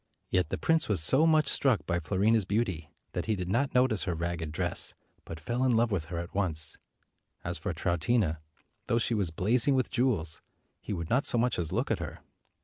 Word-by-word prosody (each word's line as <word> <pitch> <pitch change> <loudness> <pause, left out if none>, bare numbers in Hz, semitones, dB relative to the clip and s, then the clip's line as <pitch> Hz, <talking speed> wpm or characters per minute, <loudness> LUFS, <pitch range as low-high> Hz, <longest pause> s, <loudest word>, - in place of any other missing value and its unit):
Yet 90 -1 +1
the - - -2
prince 165 -5 +1
was 105 - +2
so 130 - +4
much 155 -2 +4
struck 135 -5 +2
by 85 -1 0
Fio 80 +3 -3
rina's 110 +2 +4
beauty, 95 -6 -1 0.2
that - - -3
he 110 - +1
did 90 -2 -4
not 130 +8 0
notice 125 -5 +3
her 90 -4 -1
ragged 85 -1 -3
dress, 75 - -2 0.3
but 80 - -7
fell 120 +10 -2
in 125 -3 +3
love 115 0 +2
with 90 -6 -1
her 85 +1 -6
at 85 +1 -5
once. 80 -6 -1 0.7
As - - -3
for - - -3
Troutina, 85 -1 0 0.5
though 115 - +2
she 120 0 +1
was 100 -6 0
blazing 115 - +2
with 130 - 0
jewels, 110 - +1 0.4
he - - -8
would 85 -5 -4
not 130 +4 +3
so - - +4
much 120 -2 +1
as 85 -3 -3
look - - -1
at - - +1
her. - - -7
100 Hz, 215 wpm, -29 LUFS, 85-120 Hz, 0.7 s, so